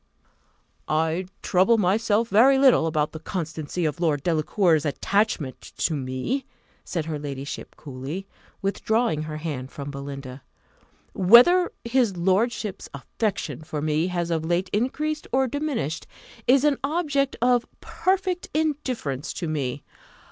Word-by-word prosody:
"I 160 +4 0 0.2
trouble 190 +5 +4
myself 215 +3 +2
very 255 +6 +6
little 265 -11 +5
about 155 -1 0
the 160 - -7
constancy 160 -1 -3
of 150 -1 -2
Lord 150 -5 +1
Delacour's 165 0 +2
attachment 160 -2 0 0.2
to 165 - +1
me," 135 - -2 0.4
said 165 -4 -3
her 155 -2 -3
ladyship 140 -1 -6
coolly, 145 +7 -6 0.4
withdrawing 200 -3 +1
her 155 0 -5
hand 145 -5 -4
from 140 0 -6
Belinda; 140 -1 -7 0.7
"whether 245 - +6
his 235 -5 +1
lordship's 205 +3 0
affection 195 - -3
for 155 -1 -5
me 155 +3 +1
has 175 -2 -2
of 160 -1 0
late 175 +3 0
increased 300 +8 -1
or 265 +1 +3
diminished, 255 - -3 0.4
is 265 +2 +5
an 295 -2 +3
object 285 -2 0
of 245 0 +3
perfect 370 -1 -1
indifference 260 - -1
to 170 - -4
me. 140 -3 -2
180 Hz, 125 wpm, -25 LUFS, 155-240 Hz, 0.7 s, very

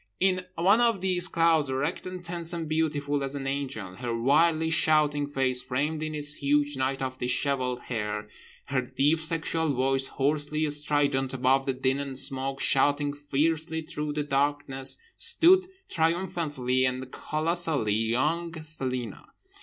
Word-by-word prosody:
In 185 -1 +2
one 195 +7 +4
of 230 -4 +2
these 180 -1 +1
clouds, 165 -5 +2
erect 140 +8 -2
and 185 -1 -7
tense 170 0 -1
and 165 -2 -4
beautiful 145 -2 -1
as 135 +1 -3
an 135 -1 -5
angel—her 120 -4 -4
wildly 160 +6 +3
shouting 150 -2 +2
face 130 -3 +1
framed 145 +5 -2
in 155 0 -3
its 145 0 +2
huge 145 0 +1
night 135 +1 -1
of 130 0 -4
dishevelled 125 0 0
hair, 105 -3 -4 0.4
her 135 -2 +1
deep 145 +5 +1
sexual 160 -1 0
voice, 135 +1 +1
hoarsely 150 +2 0
strident 145 -3 +1
above 130 +1 +2
the 135 - +1
din 130 +1 0
and 140 -2 -5
smoke, 135 0 -4
shouting 145 +1 +2
fiercely 160 +3 -1
through 150 -2 -4
the 150 0 -1
darkness—stood, 145 - +2 0.2
triumphantly 160 -7 0
and 130 0 -1
colossally 155 -7 0
young, 130 +10 0
Celina. 130 -7 -4
145 Hz, 140 wpm, -27 LUFS, 130-160 Hz, 0.4 s, one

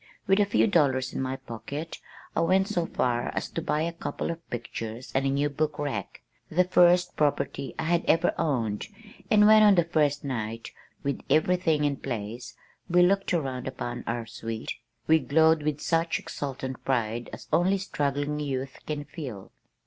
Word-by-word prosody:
With 195 +1 +3
a 205 - +5
few 205 - +3
dollars 140 - +2
in - - -2
my 130 0 -2
pocket, 135 +5 -7 0.4
I - - +2
went 190 +3 +3
so 175 -3 -1
far 120 -1 0
as - - -2
to 165 - -4
buy 155 -1 0
a 170 +1 -2
couple 170 - -3
of 165 0 -9
pictures 120 0 -6
and 135 +1 +1
a - - +2
new 140 +2 +1
book 150 +1 -2
rack, 125 -10 -4 0.3
the 180 +3 +3
first 180 0 +4
property 140 -2 -1
I - - -2
had 170 +1 +1
ever 165 +2 +3
owned, 120 -10 -1 0.4
and 210 -3 +6
when, 215 0 +8
on 205 -2 +7
that 170 -2 +1
first 145 -2 +2
night, 115 -4 -4 0.3
with 140 0 -2
everything 155 +1 +3
in 145 -1 +1
place 120 0 -5 0.3
we 175 +1 +5
looked 195 +2 +2
around 135 -8 -1
upon 120 -2 -5
our 120 -1 -2
"suite," 115 -1 -5 0.3
we 160 0 +5
glowed 160 +3 +4
with 150 -1 -1
such 165 0 +1
exultant 130 -2 -5
pride 120 -2 -1
as - - -9
only 185 +3 +3
struggling 145 -5 -2
youth 135 -2 -3
can 150 -1 -3
feel. 125 - -8
145 Hz, 175 wpm, -27 LUFS, 130-165 Hz, 0.4 s, when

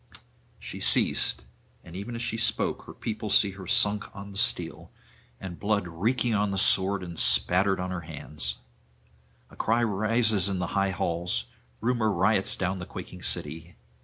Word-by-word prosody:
She - - -8
ceased; - - +2 0.4
and 85 - -12
even 100 +5 -6
as 115 - -4
she 115 - -2
spoke 115 - -1
her - - -10
people 110 -1 -5
see 100 0 +4
her 95 -1 -10
sunk 105 +3 +2
on 100 0 -9
the 100 - -9
steel, 90 -8 -1 0.5
and 90 -3 -8
blood 100 -3 0
reeking 115 +8 0
on 105 -1 +1
the 95 - -3
sword 95 0 +4
and 85 -2 -5
spattered 95 +2 +4
on 90 0 -3
her 90 -2 -4
hands. 75 -1 -3 1.0
A - - -15
cry 115 +2 +1
rises 110 -1 +2
in 95 - -2
the 90 -1 -4
high 100 0 +1
halls; 85 -6 -2 0.4
Rumour 115 -2 +1
riots 95 0 +3
down 95 0 -2
the 90 - -7
quaking - - -9
city. 80 +4 -3
95 Hz, 165 wpm, -27 LUFS, 90-110 Hz, 1.0 s, see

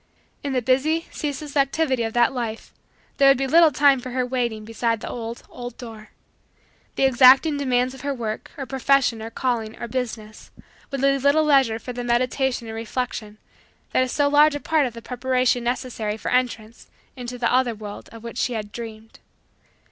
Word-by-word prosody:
In 280 -1 -2
the 250 -2 0
busy, 300 +7 +1
ceaseless, 290 0 -5
activity 275 -2 +1
of 225 -1 -2
that 240 +1 +3
life 230 -3 -5 0.4
there 275 - +5
would 275 - +5
be 270 - -1
little 325 +4 +6
time 280 -1 +4
for 255 - -7
her 255 0 -1
waiting 240 -4 -2
beside 230 0 -1
the - - -7
old, 230 0 -6
old, 245 -1 -9
door. 225 -3 -10 0.9
The - - 0
exacting 265 +3 +6
demands 255 -2 0
of 265 - -11
her 285 +1 -2
work, 225 -5 -4
or 275 - -4
profession, 265 -3 +1
or 225 - -6
calling, 230 -2 -2
or 235 - -5
business, 225 -3 -5 0.4
would 275 -2 -4
leave 275 -1 +2
little 285 +2 +4
leisure 270 -7 +3
for 250 +2 -7
the 245 0 -5
meditation 245 +1 0
and 220 0 -7
reflection 225 -2 -4 0.5
that - - +2
is 255 -1 0
so 290 -1 +2
large 295 +1 +5
a - - -3
part 310 -2 +1
of 235 - -9
the 230 - -9
preparation 250 -1 0
necessary 240 -4 -3
for - - -4
entrance 240 -3 -2 0.3
into 250 -1 -6
that 235 -1 0
other 250 -2 +2
world 210 -1 -9
of 230 -1 -12
which 235 +1 -6
she 250 - 0
had 210 -2 -5
dreamed. 225 -1 -9
250 Hz, 190 wpm, -23 LUFS, 230-270 Hz, 0.9 s, little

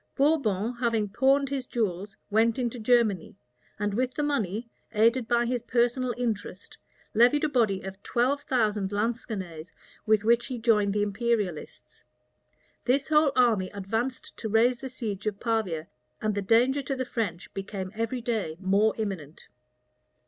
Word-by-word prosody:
Bourbon, 250 -7 +2
having 230 -4 +1
pawned 270 +5 +3
his 270 -2 -3
jewels, 205 -2 -2
went 225 +2 +3
into 245 -1 -2
Germany, 220 -6 +2 0.4
and 205 -1 -1
with 255 +3 -1
the 295 - -1
money, 230 -6 -1 0.3
aided 230 +2 +3
by 240 0 +2
his 245 0 -1
personal 245 +2 +1
interest, 215 -5 -4 0.4
levied 245 +7 +4
a - - +4
body 220 -8 +1
of 190 +1 -8
twelve 260 +7 +1
thousand 215 -8 0
Lansquenets, 205 -7 -3 0.4
with 215 -1 +4
which 235 +2 +3
he 255 - -4
joined 210 -3 +2
the 205 - +2
imperialists. 205 - -3 0.8
This 265 +4 +1
whole 300 -2 +4
army 220 -7 +3
advanced 225 +6 -3
to 220 - -4
raise 235 +3 +3
the 265 - -6
siege 215 -5 -4
of 205 -1 -2
Pavia; 210 -9 -1 0.3
and 215 -1 0
the 205 - -1
danger 245 +7 +3
to 270 +1 -3
the 260 0 -2
French 205 -8 -4
became 195 -1 -5
every 230 +3 -2
day 220 -9 -2
more 200 +3 +2
imminent. 185 -9 -5
225 Hz, 150 wpm, -27 LUFS, 200-245 Hz, 0.8 s, levied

